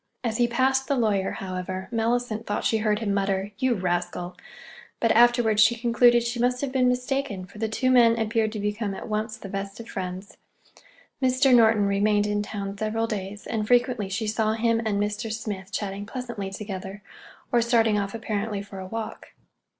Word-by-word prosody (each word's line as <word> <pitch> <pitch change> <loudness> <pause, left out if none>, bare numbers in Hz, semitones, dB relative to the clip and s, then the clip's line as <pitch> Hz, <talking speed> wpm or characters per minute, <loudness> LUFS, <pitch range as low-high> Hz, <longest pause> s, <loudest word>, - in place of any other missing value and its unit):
As 225 -2 -1
he 240 - +3
passed 265 +2 +1
the 280 - +1
lawyer, 210 -6 +1
however, 185 0 -5
Mellicent 230 -1 -1
thought 205 - -1
she 220 - +2
heard 210 -1 +1
him 210 -2 -1
mutter, 195 0 -1
"You 260 -2 +2
rascal!" 175 -1 -2 0.6
But 230 - +2
afterwards 235 -2 +4
she 235 +3 +6
concluded 240 0 +4
she 235 +1 -3
must 250 +1 +1
have 280 -2 -2
been 255 -1 +2
mistaken, 250 -5 -1
for 195 +3 -14
the 220 0 -1
two 255 +4 +1
men 235 -2 +5
appeared 220 -1 0
to 215 - -4
become 205 0 -2
at - - -7
once 215 +1 -2
the 215 - -9
best 195 +1 -5
of 230 - -8
friends. 185 0 -6 0.8
Mr. 255 +1 +4
Norton 220 -3 +5
remained 205 +1 +2
in 205 0 0
town 200 -1 -5
several 220 +1 0
days, 205 -2 -5
and 215 -2 -2
frequently 245 -4 +2
she 205 +3 -2
saw 215 0 +1
him 230 0 +1
and 200 -2 0
Mr. 210 +2 -2
Smith 210 -3 -5
chatting 200 0 -4
pleasantly 235 -5 -5
together, 195 0 -7 0.5
or 240 - +4
starting 225 -3 +3
off 200 +1 -3
apparently 210 -2 -3
for 200 -1 -10
a 185 - -7
walk. 225 +2 -6
215 Hz, 185 wpm, -25 LUFS, 200-235 Hz, 0.8 s, she